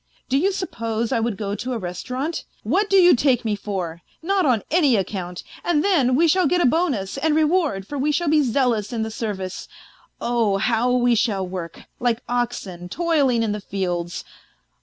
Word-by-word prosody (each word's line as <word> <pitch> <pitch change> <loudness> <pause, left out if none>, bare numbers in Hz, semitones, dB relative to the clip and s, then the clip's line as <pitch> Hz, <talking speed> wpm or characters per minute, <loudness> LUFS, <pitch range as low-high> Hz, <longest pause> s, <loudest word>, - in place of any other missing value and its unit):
Do 265 - +2
you 385 +6 +2
suppose 230 - -3
I - - +2
would 225 -3 -1
go 205 -2 -3
to 250 +5 -3
a - - -1
restaurant? 250 - -4 0.2
What 380 - +1
do 390 - +5
you 355 -3 +7
take 250 -2 +2
me 215 -2 +1
for? 185 -5 -4 0.2
Not 380 -1 +2
on 240 -5 +2
any 300 -7 +4
account. 185 -3 -3 0.2
And 320 -3 +1
then 280 -11 +3
we 335 +5 +4
shall 370 +3 +3
get 355 - +2
a - - +3
bonus 255 - 0
and 305 +1 +1
reward, 310 - +1
for 285 +6 -5
we 295 +3 +1
shall 340 +3 0
be 305 0 +4
zealous 240 -5 +1
in 230 -2 -1
the 220 - -4
service 195 -5 -4 0.5
oh! 230 -4 +1
how 235 +4 +1
we 245 -1 +3
shall 210 -5 0
work, 180 -2 -6 0.2
like 240 -1 0
oxen 230 -8 -3
toiling 285 - +1
in 220 - 0
the 210 0 -3
fields. 175 -3 -3
240 Hz, 190 wpm, -22 LUFS, 205-300 Hz, 0.5 s, you